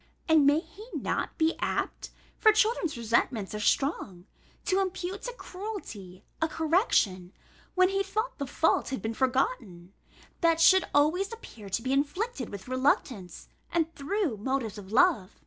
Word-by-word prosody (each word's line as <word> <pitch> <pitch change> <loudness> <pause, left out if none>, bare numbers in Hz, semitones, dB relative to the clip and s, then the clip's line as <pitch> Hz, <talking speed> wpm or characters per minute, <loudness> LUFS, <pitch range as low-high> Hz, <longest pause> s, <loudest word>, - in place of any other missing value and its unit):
And 315 -3 +5
may 295 +3 +4
he 420 +5 -14
not - - -2
be 320 0 +2
apt - - -2 0.3
(for 435 - +7
children's 430 - +1
resentments 230 -2 0
are 210 - -3
strong) 210 - 0 0.4
to 380 0 +2
impute 380 0 -3
to - - -5
cruelty 355 - -8 0.2
a 320 - +3
correction 305 - +1 0.4
(when 370 0 +5
he 390 0 0
thought 425 +2 -3
the 280 - -3
fault 320 - +1
had 265 - -4
been 225 +1 -2
forgotten) 235 - -1 0.5
that 330 -1 +3
should 375 +3 +6
always 325 +8 +2
appear 230 - -10
to 225 +4 -2
be 260 +1 0
inflicted 290 - -1
with 200 +1 -9
reluctance, 255 -7 -1 0.2
and 330 -1 0
through 320 - -2
motives 225 -2 -2
of 195 -1 -11
love? 245 - +3
290 Hz, 150 wpm, -28 LUFS, -, 0.5 s, for